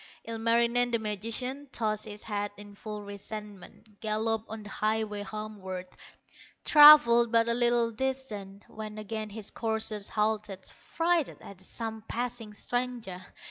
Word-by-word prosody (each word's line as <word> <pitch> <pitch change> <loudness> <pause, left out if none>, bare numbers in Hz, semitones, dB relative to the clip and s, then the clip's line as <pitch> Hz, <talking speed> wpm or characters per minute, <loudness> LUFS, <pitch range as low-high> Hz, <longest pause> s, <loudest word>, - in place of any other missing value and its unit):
Ilmarinen, 235 +2 +3
the 235 - +1
magician, 230 +6 -2
Tossed 215 -3 -1
his 210 -1 -7
head 205 -1 -2
in 205 0 -11
full 210 0 -7
resentment, 205 0 -9
Galloped 220 0 -1
on 220 0 -7
the 205 - -10
highway 215 -1 -1
homeward; 205 -3 -6 0.8
Travelled 265 -6 +9
but 230 0 +4
a 235 - +2
little 240 -1 +2
distance, 220 -6 -4
When 215 -1 -8
again 215 0 -4
his 210 0 -6
courser 220 -1 -2
halted, 210 -3 -1
Frighted 335 -2 -1
at 195 -2 -12
some 220 +3 -5
passing 235 -3 -4
stranger. 245 -6 -3
220 Hz, 130 wpm, -29 LUFS, 210-235 Hz, 0.8 s, Travelled